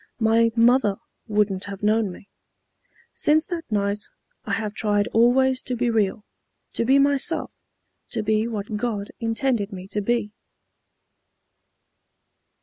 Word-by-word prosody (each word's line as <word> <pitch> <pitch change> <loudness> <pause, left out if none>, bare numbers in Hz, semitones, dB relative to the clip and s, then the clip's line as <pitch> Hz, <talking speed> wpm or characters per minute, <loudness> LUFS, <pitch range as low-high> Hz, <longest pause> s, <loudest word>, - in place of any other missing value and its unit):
My 230 0 +3
mother 230 -3 +4 0.3
wouldn't 205 -3 +1
have 200 0 -8
known 215 -1 +2
me. 190 - -13 0.9
Since 310 +1 +2
that 335 -7 -6
night 200 0 0 0.5
I - - -2
have 215 -2 -2
tried 205 -2 +1
always 255 +3 +3
to 250 - -3
be 240 0 0
real, 210 -1 0 0.5
to 230 - -1
be 265 +3 +5
myself, 280 +3 +1 0.6
to 225 -3 -3
be 215 +1 +1
what 210 -2 -4
God 210 -3 -3
intended 225 -2 -1
me 185 -1 -8
to 210 - -2
be." 215 -1 -1
225 Hz, 130 wpm, -23 LUFS, 205-245 Hz, 0.9 s, be